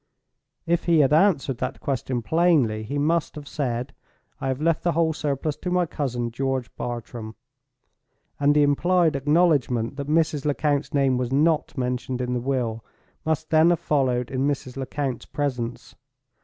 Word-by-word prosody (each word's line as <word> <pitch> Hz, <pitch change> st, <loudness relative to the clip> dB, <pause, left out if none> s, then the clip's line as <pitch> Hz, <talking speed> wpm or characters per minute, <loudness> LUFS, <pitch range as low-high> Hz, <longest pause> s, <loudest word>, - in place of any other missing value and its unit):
If 170 Hz, 0 st, 0 dB
he 165 Hz, -3 st, +5 dB
had 140 Hz, +1 st, +3 dB
answered 155 Hz, -7 st, +3 dB
that 130 Hz, -, -3 dB
question 130 Hz, -3 st, -2 dB
plainly, 150 Hz, -6 st, +2 dB
he 125 Hz, +7 st, -4 dB
must 160 Hz, +3 st, 0 dB
have 150 Hz, -2 st, -8 dB
said: 125 Hz, -2 st, -3 dB, 0.5 s
"I -, -, -3 dB
have 130 Hz, 0 st, -1 dB
left 165 Hz, +1 st, +1 dB
the 175 Hz, -, +1 dB
whole 160 Hz, -1 st, +2 dB
surplus 150 Hz, 0 st, -2 dB
to 180 Hz, -, -4 dB
my 180 Hz, 0 st, +2 dB
cousin, 125 Hz, -7 st, -3 dB
George 130 Hz, 0 st, -2 dB
Bartram"—and 120 Hz, +4 st, -5 dB
the 150 Hz, -, +5 dB
implied 165 Hz, +3 st, +3 dB
acknowledgment 140 Hz, -5 st, +2 dB
that 140 Hz, -1 st, -4 dB
Mrs. 155 Hz, -2 st, +1 dB
Lecount's 145 Hz, 0 st, 0 dB
name 135 Hz, -3 st, +2 dB
was 125 Hz, 0 st, -2 dB
not 155 Hz, +2 st, +1 dB
mentioned 125 Hz, 0 st, -2 dB
in 125 Hz, 0 st, -2 dB
the 125 Hz, -, 0 dB
will 120 Hz, -3 st, -2 dB, 0.4 s
must 160 Hz, 0 st, -1 dB
then 160 Hz, +1 st, +5 dB
have 175 Hz, -, +2 dB
followed 130 Hz, -4 st, 0 dB
in 135 Hz, +1 st, 0 dB
Mrs. 135 Hz, -3 st, -3 dB
Lecount's 135 Hz, -1 st, -3 dB
presence. 125 Hz, -4 st, -3 dB
140 Hz, 155 wpm, -24 LUFS, 125-155 Hz, 0.5 s, he